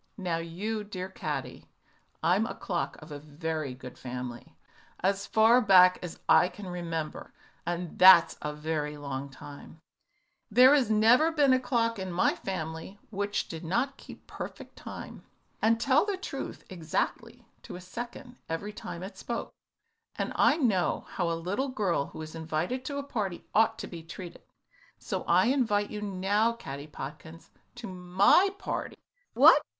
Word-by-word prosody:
"Now, 180 Hz, -4 st, -1 dB
you 195 Hz, +7 st, -4 dB
dear 190 Hz, -2 st, -6 dB
little 190 Hz, -, -19 dB
Caddy, -, -, -4 dB, 0.6 s
I'm 185 Hz, +7 st, +3 dB
a -, -, -6 dB
clock 175 Hz, -3 st, -3 dB
of 155 Hz, -, -13 dB
a 145 Hz, -, -6 dB
very 155 Hz, -2 st, -4 dB
good 125 Hz, -1 st, -11 dB
family. 125 Hz, -1 st, -7 dB, 0.5 s
As 195 Hz, +1 st, 0 dB
far 225 Hz, +3 st, +5 dB
back 185 Hz, -3 st, +6 dB
as 175 Hz, -2 st, -7 dB
I 180 Hz, -, +6 dB
can 205 Hz, -, -10 dB
remember 165 Hz, -3 st, -5 dB, 0.3 s
and 175 Hz, -1 st, -4 dB
that's 185 Hz, -2 st, +8 dB
a 150 Hz, -, -3 dB
very 150 Hz, 0 st, -3 dB
long 140 Hz, -1 st, -5 dB
time 145 Hz, +3 st, -12 dB, 0.7 s
there 250 Hz, +5 st, +7 dB
has 270 Hz, -6 st, +3 dB
never 230 Hz, +9 st, +5 dB
been 290 Hz, -4 st, +4 dB
a 255 Hz, -, +4 dB
clock 230 Hz, -3 st, 0 dB
in 190 Hz, -1 st, -4 dB
my 175 Hz, -, +2 dB
family 160 Hz, 0 st, -5 dB
which 205 Hz, 0 st, -2 dB
did 165 Hz, -1 st, -7 dB
not 240 Hz, +11 st, -1 dB
keep -, -, -13 dB
perfect -, -, -8 dB
time, -, -, -9 dB, 0.4 s
and 225 Hz, +1 st, +3 dB
tell 270 Hz, +4 st, +4 dB
the 405 Hz, -2 st, -2 dB
truth 375 Hz, -, -6 dB
exactly 165 Hz, -4 st, -3 dB, 0.2 s
to -, -, -9 dB
a -, -, -7 dB
second 240 Hz, +7 st, -8 dB
every 200 Hz, +6 st, -4 dB
time 175 Hz, -3 st, -7 dB
it 195 Hz, -, -9 dB
spoke, -, -, -4 dB, 0.6 s
and -, -, -2 dB
I -, -, +4 dB
know 215 Hz, -, +1 dB
how 175 Hz, -2 st, -1 dB
a 165 Hz, -, -1 dB
little 200 Hz, +11 st, -2 dB
girl 195 Hz, -, 0 dB
who 160 Hz, -, -8 dB
is 155 Hz, -, -9 dB
invited 165 Hz, +10 st, -2 dB
to 280 Hz, +1 st, -3 dB
a 280 Hz, -, -3 dB
party 205 Hz, -10 st, -4 dB
ought 220 Hz, +1 st, +3 dB
to -, -, -5 dB
be 170 Hz, -2 st, -8 dB
treated, 170 Hz, +2 st, -9 dB, 0.6 s
so -, -, -4 dB
I -, -, +4 dB
invite 220 Hz, -7 st, +1 dB
you 210 Hz, -, -5 dB
now, 205 Hz, +3 st, +1 dB
Caddy 140 Hz, -9 st, -8 dB
Podkins, 155 Hz, +3 st, -9 dB, 0.2 s
to 240 Hz, -1 st, -8 dB
my 185 Hz, -, +4 dB
party." -, -, -4 dB, 0.4 s
"What! -, -, +8 dB
185 Hz, 165 wpm, -29 LUFS, 160-225 Hz, 0.7 s, that's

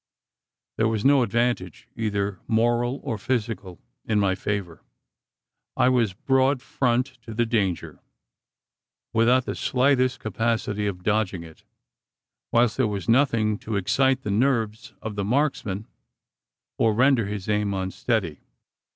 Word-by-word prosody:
There 110 Hz, -, +2 dB
was 110 Hz, 0 st, -1 dB
no 140 Hz, -1 st, +6 dB
advantage 120 Hz, -6 st, -1 dB
either 100 Hz, -3 st, -2 dB
moral 120 Hz, +3 st, +1 dB
or 115 Hz, -7 st, -3 dB
physical 105 Hz, -6 st, -3 dB, 0.2 s
in 110 Hz, -2 st, +1 dB
my 100 Hz, -2 st, +2 dB
favour. 95 Hz, -4 st, -4 dB, 1.0 s
I 125 Hz, -, +4 dB
was 120 Hz, -6 st, +2 dB
broad 135 Hz, +5 st, +2 dB
front 125 Hz, -1 st, 0 dB, 0.2 s
to 115 Hz, -2 st, -9 dB
the 120 Hz, +1 st, +2 dB
danger, 105 Hz, -6 st, -1 dB, 1.1 s
without 120 Hz, +3 st, +3 dB
the -, -, -3 dB
slightest 130 Hz, -1 st, +1 dB
capacity 110 Hz, -1 st, -1 dB
of 90 Hz, -3 st, -5 dB
"dodging" 105 Hz, -4 st, 0 dB
it; 80 Hz, -1 st, -14 dB, 0.9 s
whilst 120 Hz, -1 st, +3 dB
there 130 Hz, -3 st, +2 dB
was 100 Hz, -2 st, -4 dB
nothing 115 Hz, -4 st, +2 dB
to 110 Hz, -, -4 dB
excite 130 Hz, +7 st, +2 dB
the 105 Hz, -, -2 dB
nerves 115 Hz, 0 st, 0 dB
of 110 Hz, -, -4 dB
the 100 Hz, -1 st, -2 dB
marksman, 110 Hz, -4 st, -1 dB, 0.9 s
or 110 Hz, -2 st, +3 dB
render 125 Hz, -3 st, +3 dB
his 100 Hz, -2 st, -5 dB
aim 105 Hz, -1 st, +1 dB
unsteady. 95 Hz, -, -2 dB
110 Hz, 130 wpm, -24 LUFS, 100-125 Hz, 1.1 s, no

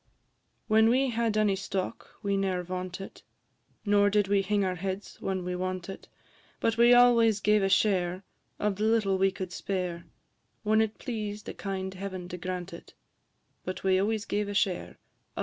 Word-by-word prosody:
When 220 Hz, 0 st, +5 dB
we 260 Hz, +2 st, +2 dB
had 230 Hz, -2 st, 0 dB
any 210 Hz, -2 st, +3 dB
stock, 195 Hz, +2 st, -5 dB
we 200 Hz, -1 st, +1 dB
ne'er 190 Hz, -2 st, 0 dB
vauntit, 185 Hz, +1 st, -6 dB, 0.6 s
Nor 205 Hz, 0 st, +4 dB
did 205 Hz, -1 st, +2 dB
we 200 Hz, 0 st, +3 dB
hing 200 Hz, 0 st, +1 dB
our 185 Hz, -, 0 dB
heads 190 Hz, +2 st, -5 dB
when 190 Hz, -2 st, -2 dB
we 180 Hz, -, -2 dB
wantit; 185 Hz, +1 st, -4 dB, 0.5 s
But 225 Hz, -, +1 dB
we 235 Hz, +1 st, +6 dB
always 235 Hz, -3 st, +6 dB
gave 210 Hz, 0 st, +3 dB
a 195 Hz, -, +1 dB
share 185 Hz, -2 st, +2 dB, 0.3 s
Of 205 Hz, -2 st, -1 dB
the 210 Hz, -, 0 dB
little 215 Hz, -4 st, +2 dB
we 195 Hz, 0 st, +4 dB
could 185 Hz, -1 st, -6 dB
spare, 180 Hz, -3 st, -3 dB, 0.6 s
When 215 Hz, +1 st, +3 dB
it 220 Hz, -1 st, -1 dB
pleased 215 Hz, -4 st, -5 dB
a -, -, -5 dB
kind 190 Hz, -1 st, -4 dB
Heaven 185 Hz, -2 st, -6 dB
to 180 Hz, -, -5 dB
grant 180 Hz, +1 st, -5 dB
it; -, -, -12 dB, 0.7 s
But 185 Hz, -, -5 dB
we 190 Hz, -1 st, +3 dB
always 215 Hz, +2 st, 0 dB
gave 205 Hz, 0 st, -1 dB
a 205 Hz, -, -4 dB
share, 190 Hz, -3 st, 0 dB, 0.4 s
&c. -, -, -3 dB
195 Hz, 175 wpm, -28 LUFS, 185-215 Hz, 0.7 s, we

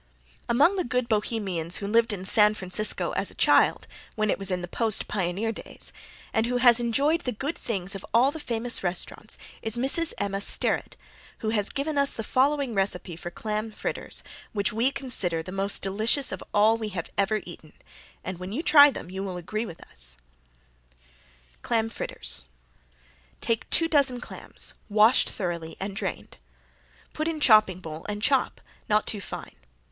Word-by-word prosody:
Among 290 Hz, +11 st, +4 dB
the 365 Hz, -, +1 dB
good 250 Hz, 0 st, -1 dB
Bohemians 205 Hz, -6 st, -1 dB
who 200 Hz, -, -5 dB
lived 230 Hz, +3 st, +2 dB
in 190 Hz, -2 st, -4 dB
San 210 Hz, +2 st, +4 dB
Francisco 195 Hz, +2 st, -1 dB
as -, -, -2 dB
a -, -, -12 dB
child -, -, +3 dB, 0.3 s
when 215 Hz, -2 st, +1 dB
it -, -, -1 dB
was 195 Hz, -1 st, +1 dB
in 180 Hz, -1 st, -1 dB
the -, -, -4 dB
post 220 Hz, +3 st, +2 dB
pioneer 195 Hz, +3 st, -1 dB
days, -, -, -6 dB, 0.4 s
and 220 Hz, +1 st, +1 dB
who 250 Hz, 0 st, 0 dB
has 240 Hz, -1 st, +6 dB
enjoyed 280 Hz, +8 st, +1 dB
the 250 Hz, -, -2 dB
good 275 Hz, +8 st, -4 dB
things 195 Hz, -3 st, -2 dB
of 195 Hz, -, -7 dB
all 245 Hz, +5 st, +4 dB
the 320 Hz, -, -7 dB
famous 235 Hz, -3 st, -1 dB
restaurants 185 Hz, +4 st, -1 dB, 0.2 s
is 220 Hz, 0 st, -3 dB
Mrs. 275 Hz, +7 st, +2 dB
Emma 200 Hz, 0 st, -2 dB
Sterett, -, -, +2 dB, 0.4 s
who 220 Hz, -, -1 dB
has 210 Hz, -2 st, +1 dB
given 285 Hz, +1 st, -2 dB
us 280 Hz, 0 st, +4 dB
the 225 Hz, -, -4 dB
following 270 Hz, +2 st, +1 dB
recipe 195 Hz, -3 st, -1 dB
for 175 Hz, +1 st, -7 dB
clam 215 Hz, +4 st, -4 dB
fritters -, -, -2 dB, 0.3 s
which 200 Hz, -1 st, 0 dB
we 230 Hz, +4 st, +2 dB
consider 245 Hz, -12 st, -1 dB
the 185 Hz, -, -8 dB
most 195 Hz, +1 st, 0 dB
delicious 220 Hz, +8 st, +1 dB
of -, -, -6 dB
all 215 Hz, +2 st, +4 dB
we 220 Hz, -2 st, -4 dB
have 180 Hz, -4 st, -6 dB
ever 205 Hz, +2 st, +1 dB
eaten, 160 Hz, -3 st, -12 dB, 0.5 s
and 185 Hz, -1 st, -5 dB
when 185 Hz, +1 st, -6 dB
you 280 Hz, +10 st, -3 dB
try 290 Hz, -3 st, +8 dB
them 180 Hz, -9 st, -7 dB
you 190 Hz, +1 st, -5 dB
will 190 Hz, -2 st, -4 dB
agree 215 Hz, +6 st, -4 dB
with 165 Hz, -, -11 dB
us: 60 Hz, +1 st, -8 dB, 1.4 s
Clam 225 Hz, -1 st, 0 dB
Fritters -, -, -1 dB, 0.9 s
Take 230 Hz, -1 st, -2 dB
two 330 Hz, -, +4 dB
dozen 275 Hz, -6 st, +3 dB
clams, -, -, -6 dB, 0.2 s
washed 215 Hz, +4 st, +4 dB
thoroughly 170 Hz, -5 st, -4 dB
and 195 Hz, +1 st, -5 dB
drained. -, -, -5 dB, 0.8 s
Put 310 Hz, +1 st, -2 dB
in 325 Hz, -2 st, -2 dB
chopping 215 Hz, -9 st, +5 dB
bowl 160 Hz, -3 st, -8 dB
and 210 Hz, 0 st, -4 dB
chop, 270 Hz, -1 st, +1 dB, 0.3 s
not 210 Hz, 0 st, +3 dB
too 210 Hz, -3 st, -1 dB
fine. -, -, -8 dB
215 Hz, 175 wpm, -26 LUFS, 190-245 Hz, 1.4 s, try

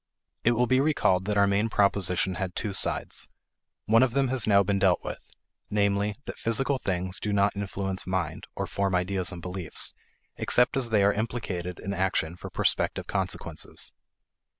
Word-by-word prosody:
It 120 Hz, -, +4 dB
will 120 Hz, +1 st, +2 dB
be 130 Hz, +1 st, +3 dB
recalled 95 Hz, -11 st, +2 dB
that 105 Hz, 0 st, 0 dB
our 100 Hz, -, +6 dB
main 100 Hz, +3 st, +1 dB
proposition 95 Hz, -3 st, +2 dB
had 90 Hz, -2 st, -3 dB
two 105 Hz, -3 st, -2 dB
sides. -, -, 0 dB, 0.6 s
One 115 Hz, +2 st, +5 dB
of 130 Hz, -3 st, +3 dB
them 135 Hz, -1 st, +2 dB
has 130 Hz, -3 st, 0 dB
now 100 Hz, -1 st, +5 dB
been 100 Hz, +1 st, 0 dB
dealt 95 Hz, -2 st, +3 dB
with: -, -, -6 dB, 0.5 s
namely, 100 Hz, 0 st, +1 dB
that -, -, -7 dB
physical 135 Hz, +4 st, 0 dB
things 95 Hz, -3 st, -2 dB
do 105 Hz, -, -2 dB
not 100 Hz, 0 st, +2 dB
influence 95 Hz, -2 st, -3 dB
mind 90 Hz, -4 st, -2 dB
(or -, -, -2 dB
form 100 Hz, -1 st, -1 dB
ideas 90 Hz, 0 st, 0 dB
and 85 Hz, -2 st, -8 dB
beliefs) 90 Hz, -2 st, -2 dB, 0.4 s
except 125 Hz, +4 st, +3 dB
as 130 Hz, -3 st, +2 dB
they 105 Hz, -3 st, +3 dB
are 100 Hz, +1 st, +4 dB
implicated 100 Hz, -5 st, -3 dB
in 100 Hz, -, -4 dB
action 90 Hz, -3 st, 0 dB
for -, -, -8 dB
prospective -, -, 0 dB
consequences. -, -, -2 dB
100 Hz, 175 wpm, -27 LUFS, 95-110 Hz, 0.6 s, our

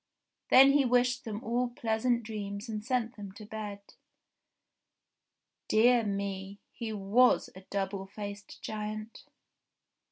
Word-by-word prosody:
Then 270 Hz, +1 st, +8 dB
he 285 Hz, 0 st, +4 dB
wished 250 Hz, +1 st, +2 dB
them 215 Hz, -1 st, -5 dB
all 240 Hz, +2 st, 0 dB
pleasant 235 Hz, 0 st, 0 dB
dreams 205 Hz, 0 st, -5 dB
and 215 Hz, -2 st, -4 dB
sent 245 Hz, -1 st, -1 dB
them 200 Hz, -2 st, -8 dB
to 210 Hz, +1 st, -10 dB
bed. 210 Hz, -1 st, -6 dB, 1.9 s
Dear 235 Hz, +2 st, +5 dB
me! 200 Hz, -1 st, -3 dB
He 230 Hz, -2 st, -5 dB
was 215 Hz, +5 st, +3 dB
a 190 Hz, -, -10 dB
double 195 Hz, -1 st, -2 dB
faced 205 Hz, 0 st, -8 dB
giant 215 Hz, +1 st, -5 dB
215 Hz, 120 wpm, -30 LUFS, 200-240 Hz, 1.9 s, Then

